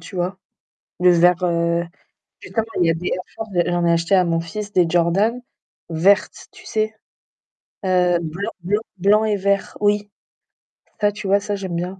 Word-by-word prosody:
tu 165 Hz, +3 st, -10 dB
vois? 180 Hz, +2 st, -2 dB, 0.6 s
Le 180 Hz, 0 st, +6 dB
vert, 175 Hz, +1 st, +4 dB
heu, 170 Hz, -1 st, +1 dB, 0.6 s
justement 225 Hz, -1 st, -3 dB
il 175 Hz, -, +4 dB
y -, -, +4 dB
a -, -, +2 dB
des 170 Hz, +2 st, -4 dB
Air 185 Hz, -, -2 dB
Force, 220 Hz, -1 st, -7 dB, 0.2 s
j'en 175 Hz, 0 st, 0 dB
ai 170 Hz, -, +3 dB
acheté 170 Hz, +3 st, +1 dB
à 185 Hz, -, +5 dB
mon 165 Hz, -1 st, 0 dB
fils 205 Hz, +5 st, -6 dB
des 180 Hz, -3 st, +4 dB
Jordan, 180 Hz, +8 st, +2 dB, 0.5 s
vertes, 195 Hz, +6 st, +2 dB
tu -, -, -16 dB
sais? 215 Hz, 0 st, -1 dB, 0.9 s
Heu, 180 Hz, -2 st, +3 dB
blanc 170 Hz, +7 st, -4 dB
blanc 205 Hz, +4 st, 0 dB, 0.2 s
blanc 205 Hz, +4 st, +3 dB
et 215 Hz, -1 st, +1 dB
vert, 200 Hz, 0 st, -1 dB
oui. 205 Hz, 0 st, +1 dB, 0.9 s
Ça, 205 Hz, 0 st, +3 dB
tu 210 Hz, -1 st, -7 dB
vois, 200 Hz, +1 st, +4 dB
ça, 205 Hz, 0 st, -3 dB
j'aime 190 Hz, -3 st, -5 dB
bien. 180 Hz, +3 st, -4 dB
185 Hz, 180 wpm, -21 LUFS, 170-205 Hz, 0.9 s, Le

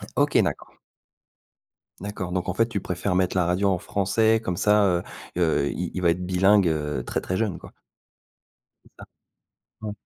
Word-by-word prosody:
OK, -, -, +2 dB
d'accord. -, -, -4 dB, 1.3 s
D'accord, 100 Hz, -3 st, -5 dB
donc 90 Hz, 0 st, -2 dB
en 90 Hz, -, -2 dB
fait 115 Hz, -, +3 dB
tu 115 Hz, -3 st, -3 dB
préfères 90 Hz, +2 st, -2 dB
mettre 90 Hz, 0 st, +1 dB
la 90 Hz, -, +3 dB
radio 90 Hz, +3 st, +1 dB
en 95 Hz, -, +1 dB
français, 110 Hz, +5 st, +1 dB
comme 90 Hz, -4 st, -2 dB
ça, 105 Hz, +2 st, +4 dB
heu 90 Hz, -1 st, +1 dB, 0.3 s
heu, 80 Hz, -5 st, +2 dB
il 90 Hz, 0 st, -4 dB
il 90 Hz, -, -3 dB
va 85 Hz, -, +3 dB
être 90 Hz, +2 st, -1 dB
bilingue, 95 Hz, +1 st, +4 dB
heu, 75 Hz, -5 st, -1 dB
très, -, -, -2 dB
très 95 Hz, -, -2 dB
jeune 105 Hz, -6 st, -1 dB
quoi? -, -, -13 dB, 1.1 s
C'est -, -, -23 dB
ça? -, -, -10 dB, 0.8 s
Ouais. 105 Hz, -1 st, -4 dB
90 Hz, 180 wpm, -24 LUFS, 90-100 Hz, 1.3 s, ça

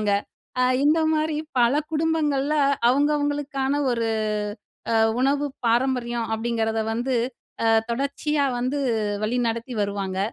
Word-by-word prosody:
பண்ணுவாங்க. 210 Hz, -1 st, +1 dB, 0.7 s
இந்த 305 Hz, +3 st, +4 dB, 0.2 s
மாரி 310 Hz, 0 st, 0 dB, 0.2 s
பல 240 Hz, +2 st, +4 dB, 0.2 s
குடும்பங்கள்ல 305 Hz, -3 st, +1 dB, 0.4 s
அவங்கவங்களுக்கான 290 Hz, 0 st, 0 dB
ஒரு 230 Hz, -1 st, -1 dB, 0.9 s
அ -, -, +2 dB, 0.3 s
உணவு 285 Hz, +2 st, +2 dB, 0.2 s
பாரம்பரியம் 240 Hz, -1 st, +1 dB
அப்டிங்கிறத 225 Hz, -1 st, -1 dB
வந்து 245 Hz, +3 st, -1 dB, 0.5 s
அ -, -, +4 dB, 0.2 s
தொடர்ச்சியா 280 Hz, +3 st, 0 dB
வந்து 255 Hz, +4 st, -1 dB, 0.5 s
வழிநடத்தி 235 Hz, +1 st, -1 dB
வருவாங்க. 200 Hz, -2 st, -3 dB
260 Hz, 100 wpm, -24 LUFS, 230-290 Hz, 0.9 s, இந்த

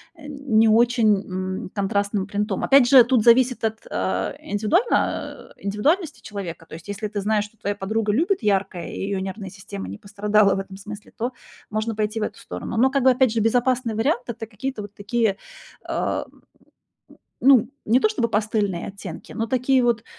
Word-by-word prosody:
а, 325 Hz, -, -18 dB, 0.3 s
не 220 Hz, 0 st, +5 dB
очень, 230 Hz, -1 st, +4 dB, 0.5 s
м, -, -, -7 dB
контрастным 200 Hz, 0 st, 0 dB
принтом. 205 Hz, -1 st, -2 dB
Опять 270 Hz, -3 st, +6 dB
же, 260 Hz, -2 st, +8 dB
тут 240 Hz, -2 st, +2 dB
зависит 245 Hz, +1 st, +4 dB
от, 220 Hz, 0 st, -1 dB
а, 95 Hz, +1 st, -1 dB
индивидуально 225 Hz, -, +1 dB, 0.6 s
а, -, -, -16 dB
индивидуальности 285 Hz, -, 0 dB
человека. 180 Hz, -6 st, -7 dB
То -, -, -8 dB
есть 165 Hz, +4 st, -12 dB
если 205 Hz, +1 st, -3 dB
ты 205 Hz, -1 st, -4 dB
знаешь, 210 Hz, +1 st, +1 dB
что 210 Hz, +2 st, -18 dB
твоя 205 Hz, 0 st, -3 dB
подруга 210 Hz, +2 st, -1 dB
любит 335 Hz, -, +1 dB
яркое, 195 Hz, -4 st, 0 dB
и -, -, -7 dB
её 195 Hz, 0 st, -2 dB
нервная 195 Hz, 0 st, -5 dB
система 100 Hz, -, -8 dB
не 100 Hz, -, -7 dB
пострадала 205 Hz, -, +2 dB
в -, -, -2 dB
этом 195 Hz, 0 st, -7 dB
смысле, 210 Hz, +1 st, -10 dB
то 240 Hz, +3 st, -2 dB, 0.4 s
можно 215 Hz, +1 st, -2 dB
пойти 215 Hz, +1 st, -1 dB
в -, -, -1 dB
эту -, -, -4 dB
сторону. 230 Hz, -, -6 dB
Но 255 Hz, +4 st, +5 dB
как 275 Hz, -1 st, +1 dB
бы, 260 Hz, -, +7 dB
опять 255 Hz, -2 st, +3 dB
же, 230 Hz, -, 0 dB
безопасный 245 Hz, +1 st, +1 dB
вариант- 245 Hz, +3 st, +1 dB
это 230 Hz, -1 st, -6 dB
какие-то 225 Hz, +2 st, -5 dB
вот 205 Hz, 0 st, -10 dB
такие, 215 Hz, 0 st, 0 dB, 0.5 s
а, -, -, -1 dB
м, -, -, -23 dB
м, -, -, -24 dB, 1.0 s
ну, 260 Hz, -4 st, +5 dB, 0.2 s
не 235 Hz, +4 st, +4 dB
то -, -, +4 dB
чтобы 415 Hz, -, -1 dB
пастельные 210 Hz, -4 st, -1 dB
оттенки, 200 Hz, 0 st, -9 dB
но 225 Hz, +1 st, -2 dB
такие 255 Hz, +2 st, +2 dB
вот 235 Hz, -2 st, +1 dB
215 Hz, 190 wpm, -23 LUFS, 200-240 Hz, 1.0 s, же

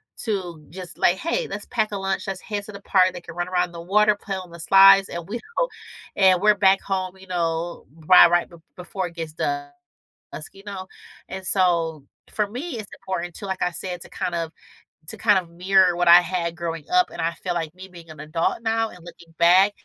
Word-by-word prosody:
to 180 Hz, -8 st, -4 dB
just 180 Hz, +2 st, -9 dB
like, 175 Hz, -, +3 dB
"Hey. 395 Hz, -, -2 dB
Let's 205 Hz, -, -6 dB
pack 220 Hz, -3 st, -1 dB
a 205 Hz, -, -3 dB
lunch. 195 Hz, 0 st, -3 dB
Let's 195 Hz, -1 st, -4 dB
head 205 Hz, -2 st, -5 dB
to 215 Hz, -, -9 dB
the 200 Hz, -1 st, -10 dB
park." 185 Hz, -2 st, +3 dB
They 180 Hz, -, -8 dB
can -, -, -11 dB
run 175 Hz, 0 st, -2 dB
around 180 Hz, -1 st, 0 dB
the 170 Hz, -1 st, -8 dB
water, 210 Hz, +4 st, +3 dB
play 205 Hz, -1 st, -5 dB
on 185 Hz, -2 st, -8 dB
the 170 Hz, -, -11 dB
slides, 195 Hz, +3 st, +7 dB
and 170 Hz, -1 st, -6 dB
we 230 Hz, +4 st, -4 dB, 0.2 s
don't -, -, +1 dB, 0.4 s
and 190 Hz, -2 st, +5 dB
we're 210 Hz, +1 st, +5 dB
back 195 Hz, -1 st, +4 dB
home, 190 Hz, -1 st, -3 dB
you 190 Hz, -, -15 dB
know, 170 Hz, -1 st, -3 dB, 0.2 s
right 180 Hz, -2 st, +8 dB
right 175 Hz, 0 st, +2 dB
b 170 Hz, -, -14 dB, 0.2 s
before 180 Hz, +1 st, -4 dB
it 170 Hz, -, -14 dB, 0.2 s
dusk, 145 Hz, 0 st, -5 dB, 0.6 s
you 195 Hz, -, -14 dB
know? 190 Hz, -2 st, -7 dB, 0.4 s
And 190 Hz, 0 st, -7 dB
so 170 Hz, -6 st, +1 dB, 0.3 s
for 210 Hz, -1 st, 0 dB
me, 250 Hz, +7 st, -6 dB
it's 215 Hz, -2 st, -6 dB
important 175 Hz, -2 st, -4 dB
to, -, -, -8 dB
like 190 Hz, -1 st, -4 dB
I 180 Hz, -, +1 dB
said, 180 Hz, 0 st, -5 dB
to -, -, -15 dB
kind 175 Hz, -, -4 dB
of 165 Hz, -1 st, -3 dB, 0.5 s
to 220 Hz, -, -7 dB
kind 205 Hz, -2 st, +4 dB
of 175 Hz, -2 st, -10 dB
mirror 180 Hz, +1 st, +3 dB
what 175 Hz, 0 st, 0 dB
I 175 Hz, +1 st, +10 dB
had 170 Hz, -1 st, -3 dB
growing 165 Hz, -2 st, -4 dB
up, 360 Hz, 0 st, +3 dB
and -, -, -6 dB
I 165 Hz, +1 st, 0 dB
feel 180 Hz, 0 st, -4 dB
like 165 Hz, -2 st, -3 dB
me 185 Hz, +1 st, -11 dB
being 170 Hz, -2 st, -14 dB
an 155 Hz, -2 st, -12 dB
adult 155 Hz, +7 st, -2 dB
now 225 Hz, 0 st, 0 dB
and 180 Hz, -, -14 dB
looking 170 Hz, -1 st, -14 dB
back, 185 Hz, +4 st, +5 dB
185 Hz, 225 wpm, -23 LUFS, 170-195 Hz, 0.6 s, I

